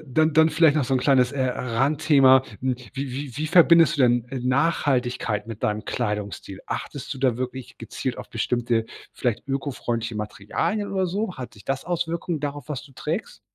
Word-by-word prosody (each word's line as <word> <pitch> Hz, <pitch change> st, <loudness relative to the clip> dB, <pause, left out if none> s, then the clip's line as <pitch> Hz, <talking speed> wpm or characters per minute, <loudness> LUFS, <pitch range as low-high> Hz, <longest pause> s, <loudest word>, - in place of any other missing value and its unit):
dann 155 Hz, +4 st, +2 dB
dann 160 Hz, +1 st, +5 dB
vielleicht 160 Hz, -1 st, +4 dB
noch 145 Hz, -, +2 dB
so 135 Hz, -, 0 dB
'n 130 Hz, -, +2 dB
kleines, 130 Hz, -1 st, +3 dB
äh, 135 Hz, -2 st, -1 dB
Randthema. 130 Hz, +2 st, +3 dB, 0.2 s
Hm, 130 Hz, 0 st, 0 dB, 0.2 s
wie 135 Hz, -1 st, -4 dB
wie 135 Hz, -1 st, -6 dB
wie 155 Hz, +1 st, -2 dB
verbindest 170 Hz, -1 st, +6 dB
du 135 Hz, -, +3 dB
denn, 120 Hz, -1 st, +3 dB
äh, 135 Hz, -, -4 dB
Nachhaltigkeit 125 Hz, -5 st, 0 dB
mit 115 Hz, -2 st, -8 dB
deinem 105 Hz, +1 st, -1 dB
Kleidungsstil? 105 Hz, -4 st, -4 dB
Achtest 145 Hz, +1 st, -5 dB
du -, -, -9 dB
da 125 Hz, -3 st, +2 dB
wirklich 130 Hz, 0 st, -6 dB
gezielt -, -, -4 dB
auf -, -, -8 dB
bestimmte, 120 Hz, -2 st, 0 dB, 0.3 s
vielleicht 120 Hz, -1 st, -2 dB
ökofreundliche 120 Hz, -4 st, -3 dB
Materialien 105 Hz, -, -2 dB
oder 190 Hz, -1 st, +1 dB
so? 195 Hz, +2 st, -3 dB
Hat 125 Hz, -2 st, -7 dB
dich 105 Hz, -, -16 dB
das 135 Hz, 0 st, -2 dB
Auswirkungen 170 Hz, -2 st, -2 dB
darauf, 145 Hz, -2 st, -5 dB
was 140 Hz, -3 st, -4 dB
du 140 Hz, -1 st, -16 dB
trägst? -, -, -4 dB
135 Hz, 180 wpm, -24 LUFS, 120-155 Hz, 0.3 s, verbindest